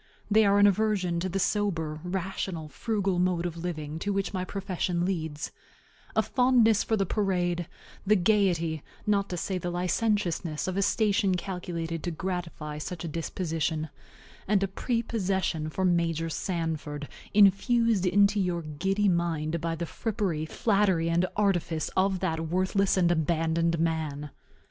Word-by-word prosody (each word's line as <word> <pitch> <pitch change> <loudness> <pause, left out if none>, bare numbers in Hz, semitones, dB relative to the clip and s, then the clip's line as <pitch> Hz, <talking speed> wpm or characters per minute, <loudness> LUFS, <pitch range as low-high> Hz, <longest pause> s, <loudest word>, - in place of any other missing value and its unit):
They 215 0 +5
are 200 0 +4
an 205 - +6
aversion 200 -4 +2
to 185 +2 -2
the 190 - -2
sober, 170 -6 -1
rational, 180 -3 -3
frugal 200 -2 -1
mode 180 -1 +1
of 170 -2 -3
living 160 -3 -4
to 205 - -2
which 195 0 -1
my 185 -1 -1
profession 185 -2 -2
leads; 160 -5 -3 0.6
a - - +4
fondness 245 -4 +4
for 220 - 0
the 195 - +1
parade, 175 -4 0 0.4
the 210 +2 +4
gayety, 175 -5 +2 0.2
not 200 -1 +1
to 180 - -3
say 185 +2 -2
the 175 - -3
licentiousness, 180 -3 0
of 185 - -2
a 200 - +1
station 200 -2 +2
calculated 175 -3 -4
to 175 - -2
gratify 165 -3 -4
such 175 +2 -5
a - - -3
disposition; 160 -1 -2 0.6
and 200 -1 +3
a - - +1
prepossession 195 -7 -1
for 190 +4 -1
Major 165 -2 +1
Sanford, 160 -4 -3 0.3
infused 210 0 +4
into 200 +3 +4
your 175 -3 0
giddy 195 +7 0
mind 170 -3 0
by 165 0 -1
the 170 +1 -3
frippery, 190 -6 -2
flattery, 190 -5 +2
and 175 +2 +2
artifice 175 -6 0
of 190 0 +2
that 160 0 -1
worthless 185 +2 +1
and 175 -2 +4
abandoned 165 +1 +1
man. 155 -3 -2
180 Hz, 150 wpm, -28 LUFS, 165-200 Hz, 0.6 s, an